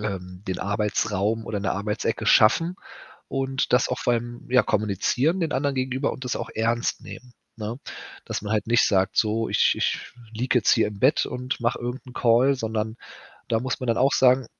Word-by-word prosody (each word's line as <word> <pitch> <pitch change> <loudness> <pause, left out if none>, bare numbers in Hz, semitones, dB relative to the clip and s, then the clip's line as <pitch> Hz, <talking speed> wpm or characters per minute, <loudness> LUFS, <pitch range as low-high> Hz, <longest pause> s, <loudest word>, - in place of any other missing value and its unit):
ähm, 90 -3 -5
den 95 -1 -3
Arbeitsraum 105 +1 -1
oder 105 - -2
'ne 100 - -1
Arbeitsecke 105 +2 -2
schaffen 165 +14 +4 0.5
und 135 -1 -2
das 125 - +4
auch - - -2
vor 120 - +1
allem, 120 +1 -5
ja, 125 0 +5
kommunizieren 110 - 0
den 160 -3 -1
anderen 140 +1 0
gegenüber 130 +2 -1
und 130 - -8
das 125 - -2
auch - - -5
ernst 115 +2 0
nehmen, 125 -1 -11 0.2
ne? 110 +2 -5 0.5
Dass - - -4
man 105 0 -3
halt 110 - 0
nicht 120 +1 +4
sagt: 95 -2 +1
„So, 110 +1 +1
ich - - +3
ich - - 0 0.3
liege 125 +2 +1
jetzt - - +3
hier 115 - +3
im 105 -1 -9
Bett 135 +4 +3
und 125 +1 -4
mache 120 0 0
irgend 125 +3 -5
'n 125 - -11
Call“, 125 +3 +3
sondern 110 -2 -3 0.5
da 115 -2 +2
muss 130 +1 -3
man 130 - -4
dann 115 - +1
auch 135 +2 +3
sagen: 130 0 +4
115 Hz, 195 wpm, -24 LUFS, 105-130 Hz, 0.5 s, ja